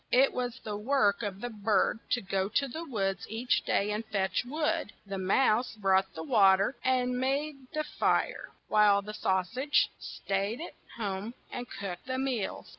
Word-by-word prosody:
It 265 Hz, +2 st, +5 dB
was 245 Hz, -1 st, -2 dB
the 210 Hz, -1 st, -4 dB
work 210 Hz, -2 st, +2 dB
of 200 Hz, -2 st, -4 dB
the 245 Hz, -, -4 dB
bird 210 Hz, 0 st, +1 dB
to 245 Hz, -, +1 dB
go 190 Hz, 0 st, -1 dB
to 275 Hz, +6 st, +1 dB
the 315 Hz, +6 st, -6 dB
woods 200 Hz, -, -2 dB
each 230 Hz, +4 st, 0 dB
day 205 Hz, +1 st, +1 dB
and 210 Hz, +2 st, -2 dB
fetch 195 Hz, -3 st, 0 dB
wood, 300 Hz, -2 st, -1 dB
the 195 Hz, -1 st, -4 dB
mouse 225 Hz, +5 st, +2 dB
brought 195 Hz, -2 st, +2 dB
the 160 Hz, -, -5 dB
wa 190 Hz, +4 st, +6 dB
ter 195 Hz, +8 st, 0 dB
and 250 Hz, -1 st, +1 dB
made 275 Hz, +1 st, -1 dB
the 305 Hz, 0 st, -1 dB
fire, -, -, 0 dB, 0.2 s
while 205 Hz, -1 st, +4 dB
the 210 Hz, +1 st, -7 dB
sau 190 Hz, -3 st, +1 dB
sage 255 Hz, +10 st, +1 dB
staid 200 Hz, +4 st, -2 dB
at 340 Hz, -, -7 dB, 0.2 s
home 205 Hz, +1 st, -3 dB, 0.2 s
and 245 Hz, 0 st, -5 dB
cooked 190 Hz, +1 st, -6 dB
the 260 Hz, 0 st, -1 dB
meals. 260 Hz, -6 st, -2 dB
215 Hz, 180 wpm, -30 LUFS, 195-255 Hz, 0.2 s, wa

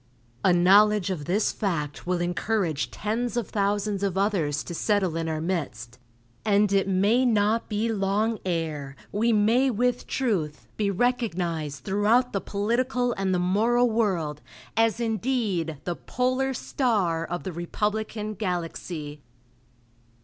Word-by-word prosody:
A 185 Hz, -, +5 dB
knowledge 195 Hz, +2 st, +5 dB
of 155 Hz, -6 st, -4 dB
this 195 Hz, +7 st, +1 dB
fact 165 Hz, -8 st, -3 dB
will 180 Hz, -1 st, 0 dB
encourage 175 Hz, -3 st, -1 dB
tens 235 Hz, +3 st, -2 dB
of 235 Hz, -, -2 dB
thousands 205 Hz, 0 st, 0 dB
of 195 Hz, -2 st, -1 dB
others 170 Hz, -8 st, 0 dB
to 175 Hz, -, -7 dB
settle 190 Hz, -2 st, +1 dB
in 165 Hz, 0 st, -2 dB
our 155 Hz, -1 st, -2 dB
midst, 135 Hz, -, -4 dB, 0.4 s
and 205 Hz, -1 st, +3 dB
it 195 Hz, 0 st, +3 dB
may 200 Hz, +6 st, +3 dB
not 220 Hz, -1 st, +2 dB
be 215 Hz, +1 st, 0 dB
long 210 Hz, +2 st, 0 dB
ere 155 Hz, -6 st, -3 dB, 0.2 s
we 230 Hz, +3 st, +2 dB
may 225 Hz, +5 st, +3 dB
with 245 Hz, +1 st, 0 dB
truth 180 Hz, -, -1 dB
be 205 Hz, -2 st, 0 dB
recognized 175 Hz, -, -1 dB
throughout 215 Hz, -, +2 dB
the 195 Hz, -, 0 dB
political 245 Hz, +4 st, 0 dB
and 195 Hz, -1 st, -1 dB
the 185 Hz, -, +2 dB
moral 225 Hz, +7 st, +2 dB
world 175 Hz, -10 st, 0 dB, 0.3 s
as 225 Hz, 0 st, +2 dB
indeed 220 Hz, -, -1 dB
the 175 Hz, -, -2 dB
"Polar 255 Hz, +4 st, -1 dB
Star" 200 Hz, -, 0 dB
of 175 Hz, +1 st, -4 dB
the 185 Hz, -, -5 dB
republican 210 Hz, +5 st, -2 dB
galaxy.... 170 Hz, -6 st, -4 dB
200 Hz, 135 wpm, -26 LUFS, 175-225 Hz, 0.4 s, A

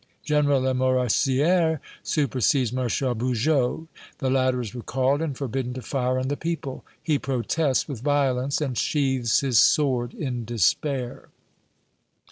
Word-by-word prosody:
General 145 Hz, -3 st, +2 dB
Lamoricière 130 Hz, -, +2 dB, 0.2 s
supersedes 130 Hz, -3 st, +1 dB
Marshal 125 Hz, 0 st, 0 dB
Bugeaud 125 Hz, +5 st, 0 dB, 0.3 s
the 130 Hz, -3 st, -1 dB
latter 130 Hz, -1 st, +2 dB
is 115 Hz, -5 st, -5 dB
recalled 130 Hz, +4 st, 0 dB
and 150 Hz, -5 st, -3 dB
forbidden 130 Hz, -2 st, -3 dB
to 130 Hz, -, -5 dB
fire 130 Hz, 0 st, -1 dB
on 130 Hz, 0 st, -1 dB
the 145 Hz, -, -1 dB
people. 155 Hz, -4 st, -4 dB, 0.2 s
He 150 Hz, -4 st, +1 dB
protests 135 Hz, +2 st, 0 dB
with 130 Hz, -6 st, -6 dB
violence, 140 Hz, -1 st, +1 dB
and 135 Hz, -4 st, -2 dB
sheathes 130 Hz, -2 st, +1 dB
his 130 Hz, -5 st, +3 dB
sword 125 Hz, -5 st, +2 dB
in 125 Hz, -6 st, -3 dB
despair." 120 Hz, -, -1 dB
130 Hz, 125 wpm, -24 LUFS, 125-145 Hz, 0.3 s, his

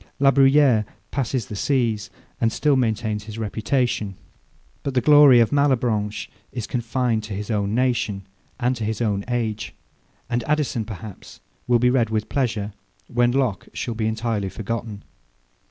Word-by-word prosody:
La 135 Hz, 0 st, +5 dB
Bruyere 135 Hz, -4 st, +5 dB, 0.3 s
passes 130 Hz, -4 st, -1 dB
the 105 Hz, -, -7 dB
seas, 115 Hz, -3 st, 0 dB, 0.3 s
and 115 Hz, -, +2 dB
still 150 Hz, +3 st, +2 dB
maintains 110 Hz, -4 st, -1 dB
his 110 Hz, 0 st, -8 dB
reputation: 110 Hz, -1 st, -1 dB, 0.7 s
But 140 Hz, -2 st, -4 dB
the -, -, +5 dB
glory 145 Hz, -4 st, +7 dB
of 115 Hz, -2 st, +3 dB
Malebranche 120 Hz, -7 st, +1 dB, 0.2 s
is 120 Hz, -4 st, -4 dB
confined 120 Hz, -1 st, -1 dB
to 105 Hz, -2 st, -5 dB
his 105 Hz, +3 st, -4 dB
own 100 Hz, 0 st, 0 dB
nation, 120 Hz, -6 st, 0 dB, 0.3 s
and 125 Hz, +1 st, +1 dB
to 115 Hz, -, -4 dB
his 110 Hz, +1 st, -2 dB
own 105 Hz, -4 st, 0 dB
age. 115 Hz, -3 st, -2 dB, 0.5 s
And 120 Hz, -1 st, -1 dB
Addison, 150 Hz, -7 st, 0 dB
perhaps, 105 Hz, -2 st, -9 dB, 0.3 s
will 120 Hz, -1 st, +5 dB
be 125 Hz, +1 st, +3 dB
read 120 Hz, -4 st, +2 dB
with 110 Hz, -1 st, -2 dB
pleasure, 110 Hz, -7 st, -1 dB, 0.4 s
when 120 Hz, 0 st, +2 dB
Locke 125 Hz, -7 st, -1 dB
shall 120 Hz, -, -3 dB
be 110 Hz, -1 st, -1 dB
entirely 110 Hz, -3 st, -1 dB
forgotten. 110 Hz, 0 st, -5 dB
115 Hz, 155 wpm, -23 LUFS, 110-130 Hz, 0.7 s, glory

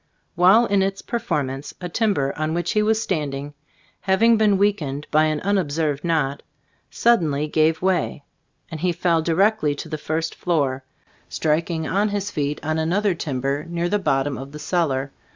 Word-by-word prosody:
While 190 Hz, +7 st, +5 dB
in 200 Hz, -3 st, +2 dB
its 195 Hz, 0 st, -2 dB
perform 170 Hz, -, -2 dB
ance, 135 Hz, +2 st, -8 dB
a 180 Hz, -, -4 dB
timber 175 Hz, -8 st, 0 dB
on 155 Hz, +1 st, -2 dB
which 175 Hz, 0 st, -1 dB
he 210 Hz, -, +2 dB
was 220 Hz, +1 st, +2 dB
stand 155 Hz, -10 st, -2 dB
ing, 145 Hz, +2 st, -7 dB, 0.5 s
having 225 Hz, +4 st, +3 dB
been 210 Hz, -2 st, +3 dB
weakened 155 Hz, -8 st, 0 dB
by 155 Hz, +1 st, +4 dB
an 155 Hz, -1 st, 0 dB
un 200 Hz, +1 st, +1 dB
observed 150 Hz, -3 st, -1 dB
knot, 150 Hz, -5 st, 0 dB, 0.5 s
suddenly 155 Hz, -11 st, +2 dB
gave 160 Hz, +2 st, +1 dB
way, 185 Hz, -6 st, 0 dB, 0.5 s
and 160 Hz, -, -5 dB
he 180 Hz, +2 st, 0 dB
fell 170 Hz, -1 st, +1 dB
directly 170 Hz, -1 st, +2 dB
to 150 Hz, -, -7 dB
the 155 Hz, -1 st, -5 dB
first 160 Hz, +2 st, -2 dB
floor, 140 Hz, -7 st, -1 dB, 0.5 s
striking 160 Hz, +1 st, -1 dB
on 205 Hz, +5 st, +1 dB
his 205 Hz, 0 st, -3 dB
feet 145 Hz, 0 st, -2 dB
on 155 Hz, +1 st, 0 dB
another 190 Hz, +5 st, +1 dB
timber 140 Hz, -2 st, -2 dB
near 170 Hz, 0 st, -1 dB
the 205 Hz, +2 st, +1 dB
bottom 135 Hz, -6 st, 0 dB
of 135 Hz, +2 st, -9 dB
the -, -, -7 dB
cellar. 145 Hz, -5 st, -1 dB
160 Hz, 175 wpm, -22 LUFS, 145-195 Hz, 0.5 s, While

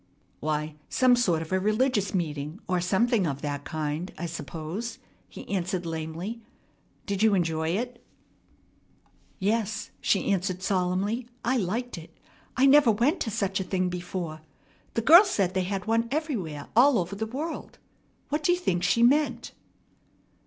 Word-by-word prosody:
"Why, 150 Hz, 0 st, -2 dB
some 255 Hz, -1 st, +4 dB
sort 175 Hz, -10 st, +1 dB
of 160 Hz, -, -12 dB
a 190 Hz, -, +2 dB
religious 215 Hz, +1 st, +1 dB
meeting, 155 Hz, -1 st, -3 dB
or 180 Hz, -1 st, +1 dB
something 195 Hz, +2 st, +2 dB
of 140 Hz, -1 st, -4 dB
that 145 Hz, -1 st, -3 dB
kind, 155 Hz, +3 st, -3 dB
I 170 Hz, -, -4 dB
suppose," 170 Hz, -, -5 dB, 0.3 s
he -, -, -10 dB
answered 185 Hz, -1 st, -2 dB
lamely. 165 Hz, +7 st, -5 dB, 0.6 s
"Did 200 Hz, -1 st, -2 dB
you 220 Hz, -2 st, +5 dB
enjoy 165 Hz, -1 st, 0 dB
it?" 245 Hz, +1 st, -5 dB, 1.3 s
"Yes," 215 Hz, +1 st, -1 dB
she 200 Hz, -, +1 dB
answered 185 Hz, -1 st, -1 dB
solemnly, 195 Hz, +5 st, 0 dB, 0.2 s
"I 255 Hz, +2 st, +2 dB
liked 225 Hz, +1 st, -2 dB
it. 160 Hz, -, -15 dB, 0.4 s
I 260 Hz, -, +5 dB
never 280 Hz, -2 st, +7 dB
went 240 Hz, -, +2 dB
to -, -, -2 dB
such 195 Hz, -3 st, -1 dB
a -, -, -1 dB
thing 185 Hz, -1 st, -1 dB
before. 175 Hz, -3 st, -5 dB, 0.5 s
The 230 Hz, -, 0 dB
girl 335 Hz, -, +9 dB
said 200 Hz, -, 0 dB
they 185 Hz, -1 st, 0 dB
had 195 Hz, 0 st, -3 dB
one 230 Hz, +1 st, +1 dB
everywhere 230 Hz, -, -3 dB
all 255 Hz, +2 st, +6 dB
over 180 Hz, +2 st, -2 dB
the 220 Hz, +2 st, -3 dB
world. 295 Hz, +8 st, -5 dB, 0.5 s
What 300 Hz, +2 st, 0 dB
do 330 Hz, -, +3 dB
you 355 Hz, -, +3 dB
think 185 Hz, -, 0 dB
she 185 Hz, +7 st, +3 dB
meant?" 290 Hz, +5 st, +2 dB
195 Hz, 155 wpm, -27 LUFS, 170-235 Hz, 1.3 s, girl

